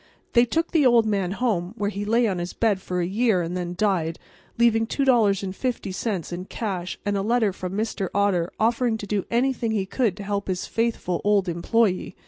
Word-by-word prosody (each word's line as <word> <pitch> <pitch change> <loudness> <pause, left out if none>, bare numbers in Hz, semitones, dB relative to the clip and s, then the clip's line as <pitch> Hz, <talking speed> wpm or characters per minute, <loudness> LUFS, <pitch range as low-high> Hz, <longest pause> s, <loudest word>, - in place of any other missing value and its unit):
They 235 0 +6
took 325 +7 -1
the 320 -3 +3
old 240 -3 +5
man 195 -4 0
home, 205 -5 -1
where 205 -1 -1
he 205 0 -4
lay 230 +2 +3
on 190 -4 -1
his 175 +1 -4
bed 210 -4 +1
for 180 -1 -2
a - - 0
year 200 -1 +1
and 170 +2 -4
then 175 -1 -3
died, 180 -6 0 0.4
leaving 225 -1 +3
$2.50 205 - 0
in 180 +1 -5
cash 190 -5 -4
and 205 0 0
a 195 - 0
letter 220 -1 +1
from 185 0 -5
Mr. 205 -2 -2
Otter 195 -4 +1
offering 230 +1 +2
to 215 - -7
do 200 -1 -1
anything 245 -1 +1
he 210 -3 0
could 210 -2 0
to 205 - -6
help 200 0 -2
his 185 -1 -2
faithful 225 -6 -1
old 205 -2 +2
employee. 185 +2 0
205 Hz, 195 wpm, -24 LUFS, 185-230 Hz, 0.4 s, They